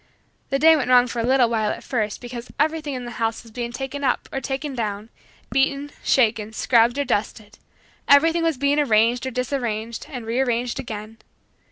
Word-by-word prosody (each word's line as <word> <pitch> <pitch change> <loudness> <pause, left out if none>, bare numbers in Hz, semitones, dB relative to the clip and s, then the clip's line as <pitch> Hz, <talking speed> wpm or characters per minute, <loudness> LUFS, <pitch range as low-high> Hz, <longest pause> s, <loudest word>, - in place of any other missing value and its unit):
The 275 - +1
day 320 +3 +6
went 260 -5 -1
wrong 250 -1 +6
for 240 -1 -5
a - - 0
little 255 0 +4
while 220 -2 0
at - - -5
first 215 -5 -2
because 245 0 -8
everything 305 -1 0
in 250 -1 -5
the 240 -1 -8
house 225 +1 -1
was 230 - -15
being 235 +1 -4
taken 270 +3 -5
up, - - 0
or 270 - -2
taken 275 +1 -4
down, 215 -3 -4 0.4
beaten, 275 +2 0
shaken, 220 -4 +2
scrubbed 235 +2 +3
or 285 - 0
dusted; 210 -1 -3 0.5
everything 325 +4 +5
was 325 -4 0
being 280 +2 +2
arranged 235 -1 +2
or - - -3
disarranged 235 -3 -3
and 245 -5 -7
rearranged 240 +1 -1
again. 220 -3 -7
245 Hz, 185 wpm, -22 LUFS, 225-275 Hz, 0.5 s, day